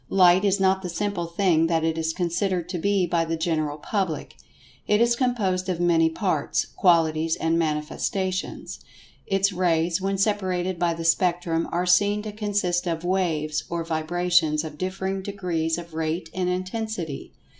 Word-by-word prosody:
Light 185 0 +5
is 200 -1 +2
not 190 0 +3
the 180 - -5
simple 185 -1 -2
thing 170 -2 +2
that 165 -1 +1
it 160 0 +1
is 160 0 -1
considered 175 +1 -1
to 180 -2 -3
be 200 +1 +2
by 170 -1 +1
the 165 0 -2
general 155 -3 -1
public. 170 -2 -3 0.5
It 210 - +3
is 235 +1 +3
composed 200 -8 0
of 175 -2 -1
many 165 -2 +3
parts, 160 -4 -1
qualities 165 -3 +2
and 165 +1 0
manifestations. 170 +4 -2 0.5
Its 195 0 +2
rays, 170 -1 +1
when 195 +1 -1
separated 185 -3 0
by 170 -1 +1
the 165 0 -6
Spectrum, 170 -1 +1
are 175 +1 0
seen 205 +3 +3
to 215 - -5
consist 205 -4 -1
of 165 -1 -2
"waves" 165 -5 0
or 170 -1 -2
vibrations 165 -1 +1
of 150 -2 -8
differing 190 +1 -2
degrees 180 -5 -2
of 170 -1 -9
rate 160 +1 -3
and 180 -1 -1
intensity. 185 -3 -4
175 Hz, 160 wpm, -24 LUFS, 165-190 Hz, 0.5 s, Light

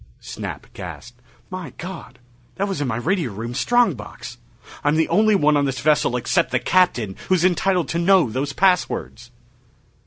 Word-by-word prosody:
Snap - - -7
gasped, 120 0 -9 0.3
"My 185 -2 -6
God, 175 -7 -8 0.4
that 200 - -1
was 195 -7 -3
in 145 - -1
my 115 - -1
radio 160 - -1
room 115 +4 -6
strong 240 - +3
box! 105 -5 -10 0.4
I'm 145 +1 +2
the 160 0 +2
only 215 0 +4
one 150 -5 +3
on 145 -1 +2
this 135 -1 -2
vessel 150 -2 +2
except 125 +1 +1
the 130 - +1
Captain 120 - +1
who's 185 -2 +3
entitled 185 -1 +2
to 170 - -1
know 185 -2 +4
those 130 +5 -3
passwords!" 180 -9 0
155 Hz, 165 wpm, -21 LUFS, 125-185 Hz, 0.4 s, only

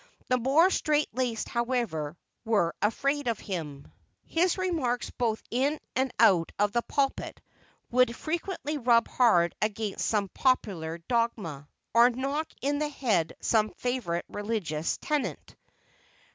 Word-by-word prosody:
The 255 - +3
more 295 +10 +4
straight 300 -3 +1
laced, 240 -2 -1
however, 235 - -2 0.3
were 205 -8 +2
afraid 275 +6 0
of 230 -3 +1
him. 150 -7 -6 0.3
His 345 +3 +1
remarks 315 -10 -1
both 225 -3 -1
in 275 +5 +1 0.2
and 260 0 +1
out 185 -8 +5
of 205 0 +2
the 235 - +1
pulpit 275 +2 -1 0.5
would 250 -1 +3
frequently 310 -2 -3
rub 235 -2 +4
hard 175 -9 +3
against 215 -1 -1
some 205 -3 0
popular 185 -12 0
dogma, 215 - -1 0.3
or 235 +1 +7
knock 275 +5 -2 0.2
in 285 +1 +1
the 300 0 0
head 220 - 0
some 215 -2 +2
favorite 235 -9 -2
religious 205 -8 -2
tenet. 300 -2 -3
235 Hz, 130 wpm, -28 LUFS, 205-275 Hz, 0.5 s, or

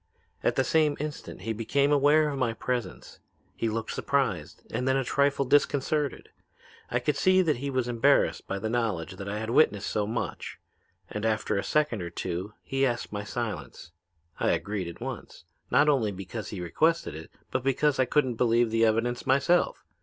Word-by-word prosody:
At - - +1
the 135 - +3
same 155 0 +2
instant 150 -9 -6
he 110 +3 -2
became 140 +6 +1
aware 145 +2 +4
of 140 -2 -4
my 120 -3 +1
presence. 115 - -4 0.4
He 115 - -1
looked 110 0 -3
surprised - - -1
and 125 - -2
then 130 0 +3
a 135 - +1
trifle 140 +1 +1
disconcerted. 145 +1 +1 0.6
I 120 - +1
could 130 +4 0
see 185 +5 +4
that 155 -6 +1
he 140 +3 -3
was 130 -2 -1
embarrassed 120 +4 +2
by 100 - -2
the 105 +3 -3
knowledge 100 -6 -2
that 100 +1 -6
I 105 - -3
had 110 +1 -3
witnessed 105 -7 +3
so 105 -1 0
much, 115 +2 -4 0.5
and 105 - -5
after 110 -1 0
a 100 - 0
second 150 -9 +1
or 85 - -4
two 90 +4 -4
he 135 0 -1
asked 120 -3 0
my 105 0 -3
silence. 105 -6 -5 0.5
I - - +2
agreed 100 -3 -2
at 85 - -9
once, - - -7 0.3
not 145 +4 +4
only 130 -8 +2
because 100 +3 -6
he 95 - -5
requested 160 - +1
it 80 +1 -9 0.2
but 130 - 0
because 135 +2 +1
I 130 - +4
couldn't 130 -2 +1
believe 120 -1 +3
the 115 0 +2
evidence 115 +2 0
myself. 140 +7 +2
120 Hz, 185 wpm, -28 LUFS, 105-140 Hz, 0.6 s, aware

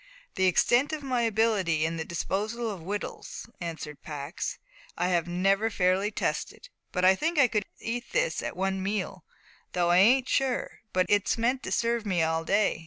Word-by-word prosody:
"The 190 -1 +2
extent 240 - +3
of 305 -2 -4
my 255 -3 0
ability 210 -8 +2
in 165 +1 -2
the 160 - -2
disposal 215 +7 -2
of 190 -4 -7
wittles," 200 +5 -5
answered 160 -3 -6
Pax, 150 +3 -5 0.4
"I 180 +1 +1
have 175 -2 +1
never 195 +5 +2
fairly 190 0 +2
tested. 355 - -3 0.3
I 185 +1 +5
think 320 - -1
I 280 -3 +6
could 210 -3 -1
eat 240 +2 -4
this - - +1
at - - -5
one 190 0 0
meal, 190 -3 -3 0.5
though 175 -1 +2
I 175 - +5
ain't 250 +6 +5
sure, 265 -2 0
but 185 0 +2
it's 205 +3 +2
meant 250 +3 +1
to - - -6
serve 235 -1 +1
me 185 -6 +1
all 160 0 0
day. 200 0 +2
195 Hz, 175 wpm, -28 LUFS, 175-235 Hz, 0.5 s, I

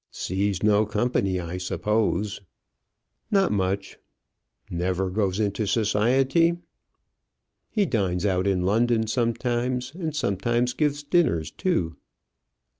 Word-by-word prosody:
"Sees 95 +1 -2
no 105 0 +4
company, 105 -3 0
I 90 +1 -5
suppose?" 100 +2 -1 0.9
"Not 195 -3 +3
much." 100 0 -2 0.7
"Never 90 +2 -1
goes 100 -1 0
into 105 0 0
society?" 130 - +2 1.1
"He 210 -3 +1
dines 95 - 0
out 95 -1 +1
in 95 -2 +1
London 110 +3 +2
sometimes; 120 +2 -1
and 160 -3 -4
sometimes 120 0 0
gives 145 0 0
dinners 145 - +1
too." 90 - -1
105 Hz, 105 wpm, -25 LUFS, 95-125 Hz, 1.1 s, no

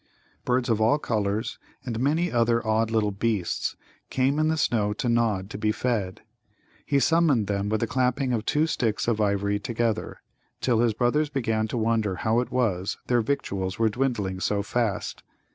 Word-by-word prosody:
Birds 125 0 +1
of 110 -2 +1
all 115 +7 +4
colours 110 -4 -2 0.3
and 115 -3 -3
many 160 +7 +1
other 115 -1 +2
odd 110 +1 +1
little 110 -2 +1
beasts 100 -2 -1 0.3
came 135 +3 +1
in 155 - +3
the 160 0 +1
snow 105 -8 +1
to 115 - -3
Nod 115 -5 +1
to 100 - -6
be 105 0 +1
fed. 105 -6 -2 0.7
He 140 - +2
summoned 155 -7 +3
them 100 0 -1
with 110 0 0
the - - +2
clapping 125 +1 0
of 110 -3 -1
two 150 +1 +2
sticks 115 -10 -1
of 110 -2 +1
ivory 100 0 +1
together, 115 0 -2 0.4
till 120 -3 +1
his 115 -2 +2
brothers 130 +6 +1
began 115 -6 0
to 120 - -3
wonder 110 -3 +1
how 110 +5 +1
it 125 - -2
was 100 -7 0
their 120 -1 +2
victuals 100 -7 -2
were 115 -1 +3
dwindling 105 -6 -1
so 100 +1 0
fast. 115 -1 -2
115 Hz, 180 wpm, -26 LUFS, 105-125 Hz, 0.7 s, all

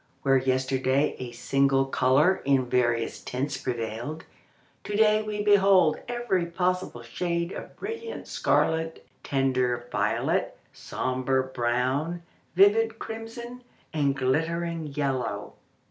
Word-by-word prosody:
Where 135 -1 +4
yesterday 130 +2 +1
a 125 -2 -5
single 135 +3 +2
colour 135 +7 +3
in 135 -2 +2
various 120 -2 0
tints 135 +3 -3
prevailed, 120 +5 -4 0.6
to 205 - -4
day 215 0 +4
we 210 -1 -3
behold 195 -5 +5
every 240 -8 -1
possible 180 -7 -2
shade 170 +7 -2
of - - -8
brilliant 455 0 -6
scarlet, 160 0 0 0.2
tender 130 -3 0
violet, - - 0 0.2
sombre 130 +1 -1
brown, 130 +7 -1 0.3
vivid 220 +4 +4
crimson, 235 +3 -7 0.3
and 140 -3 +1
glittering 165 +4 -1
yellow. 140 -3 -2
145 Hz, 105 wpm, -27 LUFS, 130-185 Hz, 0.6 s, behold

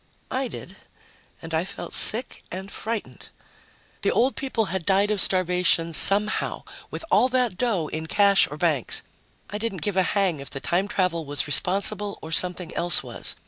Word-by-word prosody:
I 260 0 -1
did. - - -10 0.7
And 165 0 -8
I 160 +1 +1
felt 195 +2 -8
sick 240 +4 +1
and 190 +2 -7
frightened. 225 -1 -6 0.7
The - - +1
old 255 +3 +1
people 260 -5 -2
had 190 -2 -2
died 200 +3 +2
of 205 -3 +2
starvation 180 -2 +2
somehow 205 +6 +1 0.3
with - - -7
all 255 - +4
that 250 -5 0
dough 210 -7 -1
in 160 +1 -6
cash 200 +2 +4
or 145 - -8
banks. 155 -6 +1 0.5
I 210 - -4
didn't 210 -5 -4
give 205 -2 -2
a - - +5
hang 185 -4 0
if 140 - -6
the 135 - -7
time 180 +7 -1
travel 180 -5 -1
was 145 -1 0
responsible, 200 +6 +3
or 160 - -8
something 180 0 +2
else 175 -1 +2
was. - - -1
190 Hz, 175 wpm, -24 LUFS, 165-210 Hz, 0.7 s, a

